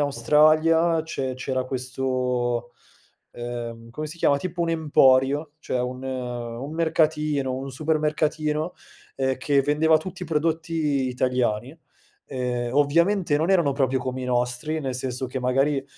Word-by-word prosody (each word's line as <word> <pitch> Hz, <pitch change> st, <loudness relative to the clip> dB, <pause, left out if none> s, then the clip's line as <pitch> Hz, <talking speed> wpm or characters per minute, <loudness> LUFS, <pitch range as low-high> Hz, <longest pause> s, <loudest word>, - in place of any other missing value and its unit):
Australia 155 Hz, +3 st, +3 dB
c'e 130 Hz, -5 st, -3 dB
c'era 130 Hz, 0 st, -2 dB
questo, 125 Hz, -2 st, -2 dB, 0.6 s
ehm, 120 Hz, -1 st, -6 dB
come 155 Hz, +5 st, -5 dB
si 165 Hz, +3 st, -7 dB
chiama, 140 Hz, -3 st, +3 dB
tipo 180 Hz, +2 st, -5 dB
un 165 Hz, -, 0 dB
emporio, 145 Hz, -2 st, +3 dB
cioè 125 Hz, -, -2 dB
un 125 Hz, +1 st, -4 dB
un 125 Hz, 0 st, -5 dB
mercatino, 155 Hz, -4 st, +1 dB
un 135 Hz, +1 st, -5 dB
supermercatino, 155 Hz, +2 st, 0 dB, 0.4 s
ehm, 130 Hz, -1 st, 0 dB
che 140 Hz, +1 st, +2 dB
vendeva 155 Hz, +3 st, +3 dB
tutti 180 Hz, +2 st, -7 dB
prodotti 160 Hz, -3 st, 0 dB
italiani. 125 Hz, +2 st, -1 dB, 0.5 s
Ehm, 125 Hz, -2 st, -2 dB
ovviamente 165 Hz, +3 st, +3 dB
non 160 Hz, +5 st, 0 dB
erano 170 Hz, -7 st, +3 dB
proprio 135 Hz, -1 st, +1 dB
come 130 Hz, 0 st, -4 dB
i -, -, -3 dB
nostri, 125 Hz, +5 st, -1 dB
nel 130 Hz, -3 st, -3 dB
senso 130 Hz, 0 st, -3 dB
che 130 Hz, +1 st, -4 dB
magari 135 Hz, +2 st, +1 dB
135 Hz, 130 wpm, -24 LUFS, 125-155 Hz, 0.6 s, Australia